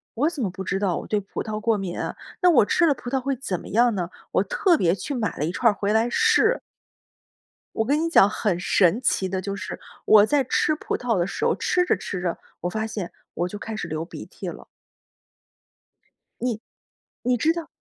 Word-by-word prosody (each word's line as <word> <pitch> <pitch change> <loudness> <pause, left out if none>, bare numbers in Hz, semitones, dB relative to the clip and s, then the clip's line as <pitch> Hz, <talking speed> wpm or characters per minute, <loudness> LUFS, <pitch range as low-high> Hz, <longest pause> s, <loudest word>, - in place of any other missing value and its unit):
“我 285 +7 +2
怎 300 - -5
么 200 - 0
不 190 +1 -7
知 195 +1 -1
道 195 -4 0
我 - - -6
对 210 - +1
葡 200 - -5
萄 215 -1 -4
过 225 -1 +2
敏 190 -3 -4
啊， - - -3 0.3
那 360 - +6
我 265 -11 +6
吃 340 - +3
了 290 - +3
葡 245 - -7
萄 270 - +1
会 270 +1 -1
怎 200 -9 -3
么 - - -11
样 235 +2 +3
呢？” 180 -2 -2 0.2
我 - - +3
特 425 -8 +2
别 175 - +2
去 280 - -5
买 220 -7 -2
了 150 - 0
一 165 - -1
串 230 +4 +3
儿 - - -7
回 205 +1 0
来 225 +2 +3
试。 455 - +3 1.2
我 220 - +1
跟 290 +5 +2
你 330 - 0
讲 260 - +6
很 205 -4 -1
神 185 +2 +3
奇 190 -6 +1
的 190 0 -2
就 200 +1 -4
是， 190 -2 -6 0.3
我 210 -1 +7
在 285 +4 +2
吃 285 +4 +1
葡 - - -3
萄 240 -4 0
的 175 0 +1
时 - - -3
候 - - +3
吃 360 0 +1
着 - - +3
吃 180 - -5
着， 175 -2 -1 0.2
我 175 - -1
发 220 +4 -2
现， 210 -5 -5 0.2
我 175 - 0
就 205 +3 -7
开 225 0 -5
始 210 - -4
流 155 0 -3
鼻 - - -9
涕 - - -9
了。 - - -7 1.7
你 235 -3 -2 0.6
你 250 +1 +2
知 305 +7 +3
道 335 -2 -5
220 Hz, 245 characters per minute, -24 LUFS, 190-270 Hz, 1.7 s, 我